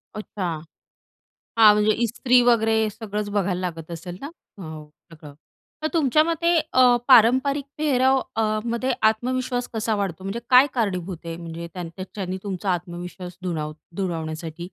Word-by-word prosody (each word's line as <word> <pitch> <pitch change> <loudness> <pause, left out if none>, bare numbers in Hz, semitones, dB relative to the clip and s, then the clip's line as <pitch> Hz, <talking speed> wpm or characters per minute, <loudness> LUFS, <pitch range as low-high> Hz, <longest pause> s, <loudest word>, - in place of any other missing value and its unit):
अच्छा. 210 -2 -6 1.2
हां. 215 -2 +9
म्हणजे 210 +1 +3
ईस्त्री 245 +2 +3
वगैरे 225 -2 +3
सगळंच 210 -1 -5
बघायला 195 -3 0
लागत 165 -2 -5
असेल 175 +2 -7
ना? 280 - -6 0.3
हो 155 -4 -9 0.2
सगळं. 150 -3 -12 0.5
तर - - +1
तुमच्या 305 -2 +3
मते 335 +1 +1 0.2
अ, 255 - +5 0.3
पारंपरिक 260 +4 +5
पेहराव 265 -3 +3 0.2
अ, 225 - +2 0.2
मध्ये 240 +2 -1 0.2
आत्मविश्वास 250 +2 -2
कसा 220 0 0
वाढतो? 190 -2 -3
म्हणजे 205 +5 -3
काय 255 +2 +8
कारणीभूत 185 -6 -2
आहे? 165 - -5
म्हणजे 170 0 -7
त्याच्याने 185 +2 -6
तुमचा 195 -1 -3
आत्मविश्वास 180 0 -6
दुणाव 155 -4 -3 0.2
दुणावण्यासाठी? 160 -3 -4
205 Hz, 135 wpm, -23 LUFS, 175-245 Hz, 1.2 s, हां